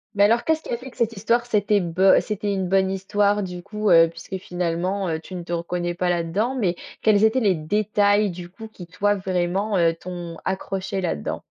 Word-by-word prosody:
Mais 200 0 +5
alors 230 +3 +3
qu'est-ce 320 0 +1
qui - - -12
a 235 - -1
fait 255 +2 -10
que - - -22
cette 230 -2 0
histoire, 235 +4 +1
c'était 210 -2 +2
beu 180 +3 +4
c'était 205 -1 -3
une 190 -2 -1
bonne 190 0 +2
histoire, 205 +2 +1
du 180 -2 -6
coup, 210 +1 -2
heu? 165 -2 +7
Puisque 190 +3 -7
finalement, 180 +2 -2
heu, 160 -1 -2
tu 165 - -12
ne 180 - -4
te 170 - -9
reconnais 175 +1 -2
pas 180 0 0
là-dedans, 175 +9 0
mais 190 -9 0 0.3
quels 215 -1 +4
étaient 220 +4 +4
les 200 -6 +2
détails 205 +4 +2
du 175 -1 -8
coup 220 +5 -10
qui, 210 -5 -11
toi, 205 +4 0
vraiment, 190 +2 -1
heu, 165 -1 +3
t'ont 175 -1 -7
accroché 190 0 -3
là-dedans? 170 - -3
190 Hz, 215 wpm, -23 LUFS, 175-210 Hz, 0.3 s, heu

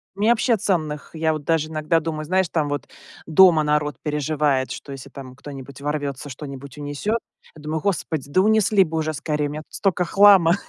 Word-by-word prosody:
Мне 210 +3 +1
вообще 235 0 +2
ценных 155 -7 -2
я 160 0 +1
вот 155 -2 -6
даже 160 -2 +1
иногда 160 +1 +1
думаю, 155 -1 -4
знаешь, 185 +1 +1
там 155 -3 0
вот 145 -3 -3 0.4
дома 165 -1 +6
народ 150 -2 0
переживает, 150 -2 0
что 140 - -8
если 135 0 -9
там 130 -2 -10
кто-нибудь 135 -1 -10
ворвется, 145 -1 -3
что-нибудь 140 0 -9
унесёт, 145 +10 -2 0.4
я 155 - -13
думаю: 155 +1 -3
"Господи, 160 -7 -2
да 185 - +3
унесли 215 -1 +4
бы 160 -2 -4
уже 155 0 -1
скорее, 150 0 -2
у 145 - -6
меня 155 - -5
тут - - -36
столько 185 -3 0
хлама". 195 -3 +6
155 Hz, 190 wpm, -22 LUFS, 145-175 Hz, 0.4 s, дома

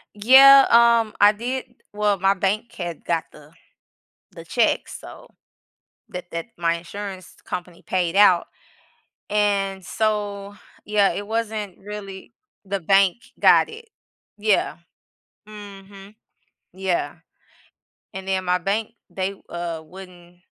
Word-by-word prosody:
Yeah, 270 +5 +8
um, 235 -2 +4
I 205 0 +8
did 245 +5 -4 0.3
Well, 205 -2 0
my 195 +1 +3
bank 200 +4 -2
had 175 -3 -7
got 165 -1 -1
the, 150 0 -17 0.8
the - - -11
check, - - 0
so - - -11 0.8
that 180 0 -7
that 170 0 -5
my 170 -1 +1
insurance 185 +2 -8
company 180 -1 -7
paid 180 -1 -1
out. 195 -4 +5 0.8
And 200 -2 0
so 205 -2 -2 0.3
Yeah, 205 -1 +2
it 205 - -5
wasn't 220 -3 -4
really 200 0 -9 0.3
the 195 0 -3
bank 195 +1 +3 0.2
got - - +5
it. 455 +1 -12 0.5
Yeah. 210 -4 +1 0.7
Mhm. 200 -1 -12 0.6
Yeah. 190 -1 -2 1.0
And 190 0 -8
then 190 -1 -1
my 180 0 +2
bank, 205 +5 -2 0.2
they, 190 +1 -3 0.2
uh, 170 -2 -5
wouldn't 175 0 -14
195 Hz, 115 wpm, -22 LUFS, 180-210 Hz, 1.0 s, Yeah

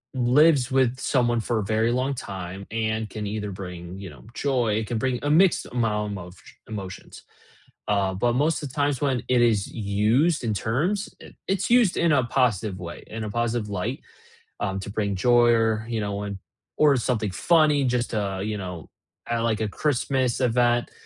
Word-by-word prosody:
lives 130 +2 +4
with 130 -1 +2
someone 120 -4 +1
for 115 +1 -1
a 110 - 0
very 110 +3 +1
long 130 +3 0
time 95 -5 -7
and 110 -1 -2
can 105 +1 -5
either 105 0 -3
bring, 90 -1 -7
you 95 -3 -8
know, 70 - -15
joy 125 -6 +1
it 110 0 -1
can 115 -1 -2
bring 130 -1 0
a 145 - 0
mixed 175 +3 +4
amount 105 -4 -1
of 90 +1 -11
sh - - -13 0.2
emotions. 95 -4 -8 0.7
Uh, 100 -2 +1
but 120 +6 0
most 150 +6 +1
the 150 - -5
times 145 0 -1
when 135 -4 0
it 125 -1 +3
is 110 -5 +3
used 115 +9 +1
in 110 - 0
terms, 145 - -1
it - - -13
it's 195 +2 0
used 235 -6 +4
in 170 -2 +3
a 140 - +4
positive 110 -6 0
way, 85 -1 -8
in 110 0 -6
a 105 - -4
positive 120 -1 -1
light, 105 +8 -3 0.6
um, 95 -1 -2
to 95 +1 -6
bring 100 -1 -1
joy 120 +4 +4
or, 110 -1 +1
you 115 -2 -2
know, 100 -1 -3
when 100 -1 -4 0.4
or 145 -3 +4
something 110 -5 -1
funny 150 - +3
just 125 -1 0
to, 100 -3 -2
you 105 0 -2
know, 90 -4 -7 0.4
kinda 115 -1 0
like 110 -2 0
a 110 - 0
Christmas 130 -1 0
event, 120 0 +2
115 Hz, 190 wpm, -25 LUFS, 100-130 Hz, 0.7 s, lives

